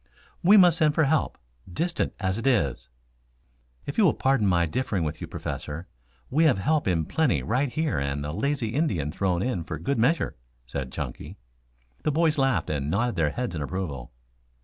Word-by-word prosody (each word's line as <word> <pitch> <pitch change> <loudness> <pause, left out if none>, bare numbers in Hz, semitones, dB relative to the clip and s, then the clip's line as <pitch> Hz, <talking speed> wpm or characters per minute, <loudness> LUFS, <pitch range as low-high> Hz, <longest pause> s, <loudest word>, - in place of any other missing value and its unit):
"We 195 +4 +7
must 175 -3 +6
send 155 -2 +3
for 160 - +4
help, 150 +2 +1 0.3
distant 170 - -1
as 95 +1 -1
it 130 - -2
is." 70 - +1 1.0
"If 140 - -3
you - - +6
will 175 - +4
pardon 130 -6 +2
my 85 -2 +3
differing 100 +1 -1
with 75 0 -4
you, - - -4
Professor, 80 +5 -6 0.4
we 155 +5 +3
have 140 -9 +4
help 150 +8 +1
in 85 -4 +1
plenty 160 - +1
right 125 +4 0
here 155 - 0
and 70 +1 -2
a 75 - -3
lazy 135 - -1
Indian 105 - 0
thrown 90 +1 0
in 110 -9 -1
for - - -5
good 140 -3 -1
measure," 150 +9 +1 0.3
said 65 +1 -5
Chunky. - - -6 0.6
The 150 - 0
boys 160 0 +2
laughed 135 -8 +1
and 70 -1 -2
nodded 115 +5 0
their 80 -3 +2
heads 120 +2 -3
in 80 - -4
approval. 70 -7 -4
115 Hz, 185 wpm, -26 LUFS, -, 1.0 s, We